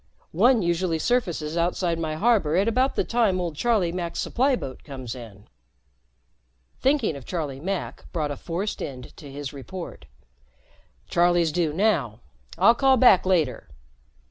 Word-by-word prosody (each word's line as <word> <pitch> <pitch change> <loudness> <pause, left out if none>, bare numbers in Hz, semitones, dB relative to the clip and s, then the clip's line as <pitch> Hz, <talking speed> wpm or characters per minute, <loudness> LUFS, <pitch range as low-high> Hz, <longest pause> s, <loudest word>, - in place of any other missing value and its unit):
One 225 +5 +4
usually 170 -1 0
surfaces 170 -7 -1
outside 170 0 0
my 155 -1 -2
harbor 200 -5 +2
at 195 +4 +2
about 255 +4 +1
the - - +1
time 220 -6 +1
old 170 -3 -3
Charlie 210 -2 +1
Mack's 170 -1 -4
supply 265 +2 +1
boat 135 - -7
comes 130 -5 -7
in." 110 -5 -12 1.3
Thinking 265 - +1
of 140 - -9
Charlie 145 -3 -4
Mack 190 +4 -5
brought 155 -4 -2
a - - -3
forced 180 +8 -4
end 130 -2 -7
to 145 -3 -11
his 145 0 -6
report. 155 +7 -8 1.0
"Charlie's 175 -1 +3
due 170 -2 0
now. 165 - 0 0.4
I'll 195 +7 +6
call 265 +1 +3
back 225 -7 +5
later." 160 -10 0
175 Hz, 145 wpm, -25 LUFS, 150-210 Hz, 1.3 s, I'll